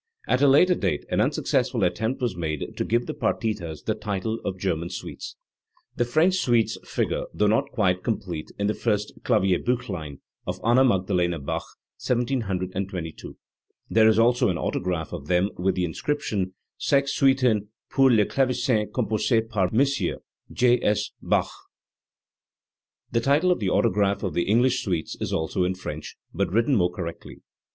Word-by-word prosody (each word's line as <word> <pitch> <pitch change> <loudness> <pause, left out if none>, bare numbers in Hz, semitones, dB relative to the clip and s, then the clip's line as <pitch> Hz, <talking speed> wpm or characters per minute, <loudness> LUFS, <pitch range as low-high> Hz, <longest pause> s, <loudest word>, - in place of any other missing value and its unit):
At 125 - +2
a 145 - +6
later 150 +7 +6
date 95 - -1
an - - +2
unsuccessful - - 0
attempt 125 +4 -1
was 120 -6 0
made 80 -4 -4
to - - -1
give 120 +2 0
the - - -4
partitas 95 -9 -2
the - - 0
title 105 +3 -3
of 95 -1 -3
"German 85 -3 -2
suites". 90 - -7 0.6
The 120 - +1
French 160 +9 +3
suites 120 -9 +2
figure, - - -2
though 105 - +2
not 110 +2 +2
quite 95 -7 +1
complete, 90 -8 -3
in 100 - -1
the 105 - +1
first 105 -3 -1
KlavierbUchlein 95 - 0 0.3
of 90 +1 -3
Anna 120 +3 +5
Magdalena 90 -7 +1
Bach 70 - -4 0.4
(1722). 95 -8 -2 0.5
There 110 0 +5
is 110 -1 +4
also 120 +1 +4
an 90 - -1
autograph 90 -2 -2
of 70 - -7
them 90 +4 +2
with 95 +2 0
the 90 - 0
in 80 - -5
scription: 100 - -2 0.2
"Sex 140 -1 +2
Suiten 130 -6 +3 0.2
pur 135 -1 +5
le 110 -4 +4
Clavesin 125 -4 0
compossee 115 -1 +1
par 100 -5 0
Mos: 135 +2 +2 0.5
J. 125 0 +3
S. 105 - 0
Bach." - - +1 1.6
The 115 - +1
title 145 +8 +3
of 180 - +1
the 100 -4 0
autograph 100 +2 +1
of 95 - -2
the 85 - 0
English 125 +3 +3
suites 85 -6 -2
is - - -2
also 80 +4 0
in 90 +1 0
French, 75 -4 -7 0.2
but 100 -4 -1
written 115 +7 +2
more 90 -7 +3
correctly. 85 -2 -7
105 Hz, 160 wpm, -25 LUFS, 90-125 Hz, 1.6 s, a